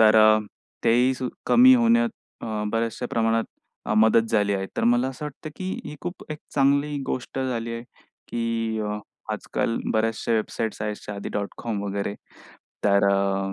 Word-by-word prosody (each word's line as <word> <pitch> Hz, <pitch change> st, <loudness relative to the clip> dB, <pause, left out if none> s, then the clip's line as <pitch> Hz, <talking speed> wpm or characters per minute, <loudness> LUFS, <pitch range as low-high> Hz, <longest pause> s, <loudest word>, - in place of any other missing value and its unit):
तर 110 Hz, 0 st, +7 dB
अ, 110 Hz, 0 st, +7 dB, 0.5 s
तेही 120 Hz, +3 st, +4 dB, 0.3 s
कमी 255 Hz, +2 st, +8 dB
होण्यात 235 Hz, -1 st, +4 dB, 0.3 s
अ, -, -, -4 dB, 0.3 s
बऱ्याचशा 115 Hz, +2 st, -1 dB
प्रमाणात 115 Hz, 0 st, +2 dB, 0.4 s
अ, 105 Hz, -, 0 dB
मदत 110 Hz, +1 st, +4 dB
झाली 105 Hz, -2 st, +2 dB
आहे. 95 Hz, 0 st, -2 dB
तर -, -, +1 dB
मला 120 Hz, +2 st, +3 dB
असं 135 Hz, +3 st, -7 dB
वाटतं, 150 Hz, +1 st, -7 dB
की 185 Hz, 0 st, -3 dB
ही 150 Hz, -, -7 dB
खूप 175 Hz, +1 st, -6 dB
एक 150 Hz, -, -4 dB, 0.2 s
चांगली 140 Hz, +1 st, +3 dB
गोष्ट 130 Hz, +1 st, -3 dB
झाली 120 Hz, -3 st, -2 dB
आहे, 115 Hz, 0 st, -5 dB, 0.5 s
की 115 Hz, -1 st, -1 dB
अ, 105 Hz, 0 st, -2 dB, 0.3 s
आजकाल 115 Hz, -, -2 dB
बऱ्याचशा 115 Hz, +1 st, 0 dB
वेबसाईट्स 110 Hz, 0 st, -1 dB
आहेत 105 Hz, -1 st, -2 dB
shadi.com 100 Hz, +1 st, -4 dB
वगैरे. 100 Hz, 0 st, -2 dB, 0.7 s
तर 100 Hz, -1 st, +4 dB
अ, 95 Hz, 0 st, 0 dB
115 Hz, 150 wpm, -25 LUFS, 105-130 Hz, 0.7 s, कमी